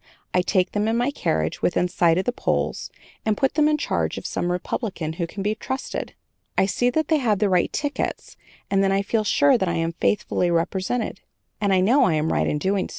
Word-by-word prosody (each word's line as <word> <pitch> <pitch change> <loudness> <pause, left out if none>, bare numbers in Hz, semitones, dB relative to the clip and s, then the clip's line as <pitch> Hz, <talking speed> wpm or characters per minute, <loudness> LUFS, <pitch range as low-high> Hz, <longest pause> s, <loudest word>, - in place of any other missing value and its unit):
I 180 - +4
take 185 0 +1
them 210 +1 0
in 225 +1 +1
my 245 +4 +1
carriage 80 - -1
within 180 0 +1
sight 170 -2 +2
of 185 - 0
the 245 - +1
polls - - -2 0.3
and 215 -2 0
put 270 - +1
them 300 0 +3
in 305 - +2
charge - - -1
of - - -7
some 175 - -1
Republican 180 -3 -3
who 170 +1 -3
can 195 +3 -6
be 210 +1 +1
trusted. 260 +4 -5 0.4
I - - +4
see 245 +5 +1
that 315 +4 0
they 315 -2 +3
have 220 -6 +1
the 205 +1 +1
right 180 -2 +2
tickets 290 -2 -3 0.4
and 195 0 +3
then 195 - +2
I 195 +1 +1
feel 215 +2 0
sure 275 +3 +4
that 190 - 0
I 170 - -1
am 165 0 0
faithfully 180 0 0
represented, 185 +7 -1 0.4
and 200 -1 +2
I 185 -1 +4
know 250 +8 +4
I 165 - +2
am 155 +1 0
right - - +1
in - - 0
so - - -8
doing. 190 0 0
195 Hz, 230 wpm, -23 LUFS, 180-245 Hz, 0.4 s, I